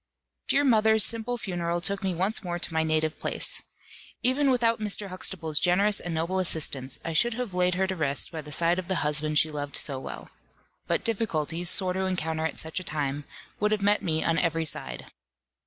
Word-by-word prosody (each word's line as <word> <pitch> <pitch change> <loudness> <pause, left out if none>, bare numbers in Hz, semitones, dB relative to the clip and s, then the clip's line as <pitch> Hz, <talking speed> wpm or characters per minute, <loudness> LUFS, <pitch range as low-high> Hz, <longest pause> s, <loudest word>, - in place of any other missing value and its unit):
Dear 285 - +3
mother's 220 -4 +4
simple 230 +2 +1
funeral 175 -5 -2
took 195 +3 0
me 190 -2 -1
once 195 +6 -1
more 175 -1 -3
to 170 - -1
my 160 - +2
native 155 0 0
place. - - +2 0.6
Even 270 +3 +2
without 235 -3 +2
Mr. 210 -1 0
Huxtable's 170 -4 -2
generous 200 +4 +3
and 175 - -6
noble 165 +4 -1
assistance, 140 -7 -1
I 165 - -3
should 235 +8 +1
have 245 -5 -4
laid 180 0 +2
her 190 +1 +1
to 190 0 -3
rest 145 -4 0
by 160 -2 -5
the 150 0 -11
side 170 +4 +2
of 180 - -6
the 185 -5 -1
husband 150 0 +1
she 155 +1 +3
loved 145 -2 -5
so 135 -3 +2
well. - - -9 0.6
But - - 0
difficulties, 175 -7 0
sore 185 -1 +3
to 190 +1 -1
encounter 160 -3 -1
at - - -8
such 160 +3 -1
a - - -8
time, 145 -3 -3 0.3
would 210 0 +1
have 210 -2 0
met 205 +1 +3
me 160 -2 0
on 165 0 +1
every 165 -1 0
side. - - -3
175 Hz, 205 wpm, -27 LUFS, 160-205 Hz, 0.6 s, mother's